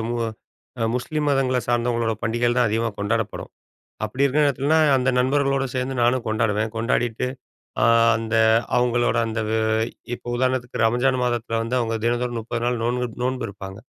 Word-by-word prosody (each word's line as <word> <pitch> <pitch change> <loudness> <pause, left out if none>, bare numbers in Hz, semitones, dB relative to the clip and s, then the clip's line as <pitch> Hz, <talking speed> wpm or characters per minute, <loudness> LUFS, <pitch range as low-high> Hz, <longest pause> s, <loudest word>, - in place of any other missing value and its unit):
மு 120 - -2 0.6
அ 115 - +2
முஸ்லீம் 150 +4 -1
மதங்கள 130 -2 +1
சார்ந்தவங்களோட 120 -1 +1
பண்டிகைகள் 120 +2 0
தான் 120 - +4
அதிகமா 115 +2 0
கொண்டாடப்படும். 105 0 -2 0.5
அப்படி 130 +6 -2
இருக்கிற 145 +2 +2
நேரத்துலன்னா, 145 +3 +2 0.2
அந்த 130 0 +2
நண்பர்களோட 135 +1 +1
சேர்ந்து 130 +1 -2
நானும் 120 0 +2
கொண்டாடுவேன். 110 0 0
கொண்டாடிட்டு 115 +1 0 0.6
அ - - +4 0.3
அந்த 115 0 -3 0.4
அவுங்களோட 120 -1 +2
அந்த 110 0 -3
வ - - -1 0.6
இப்போ 120 - -8
உதாரணத்துக்கு 130 -1 -1
ரம்ஜான் 125 +3 +1
மாதத்தில 120 -2 -1
வந்து 115 +2 -2
அவுங்க 115 -1 -1
தினந்தோறும் 120 0 0
30 115 +1 -4
நாள் 120 -1 0
நோன்பு 125 +1 0 0.2
நோன்பு 130 -1 -1
இருப்பாங்க. 95 -1 -9
120 Hz, 150 wpm, -23 LUFS, 115-130 Hz, 0.6 s, தான்